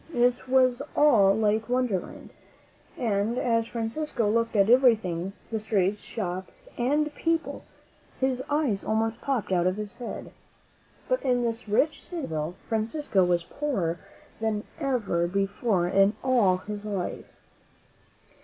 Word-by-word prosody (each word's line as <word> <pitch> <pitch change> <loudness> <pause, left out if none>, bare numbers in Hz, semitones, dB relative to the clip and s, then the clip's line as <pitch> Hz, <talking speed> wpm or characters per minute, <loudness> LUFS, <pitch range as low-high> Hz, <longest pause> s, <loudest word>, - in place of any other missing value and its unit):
It 245 +1 +2
was 255 -1 +4
all 210 -10 +5
like 220 +1 +1
Wonderland; 245 -7 -2 0.7
and, 220 0 0
as 230 -2 +1
Francisco 235 +1 -2
looked 230 +2 +1
at 200 -1 +4
everything 220 -8 +3
— - - -29
the 220 - -1
streets, 205 -2 0
shops 190 - -6
and 295 +5 +1
people 330 +1 -2 0.3
— - - -31
his 260 -1 0
eyes 290 -10 0
almost 225 +1 -1
popped 255 -9 -1
out 180 -1 +3
of 185 - +1
his 210 -1 -7
head. 245 - -7 0.8
But - - +1
in 245 -2 +1
this 230 -1 -3
rich 295 +9 +2
city 345 -2 -6
of - - -5
Seville, 155 +2 -3
Francisco 225 -1 0
was 175 -1 +2
poorer 190 - -2 0.4
than 220 -1 -1 0.2
ever 225 - 0
before 195 0 0
in 195 +3 +3
all 235 -8 +3
his 205 +2 -7
life. 200 -4 -4
225 Hz, 140 wpm, -27 LUFS, 195-255 Hz, 0.8 s, all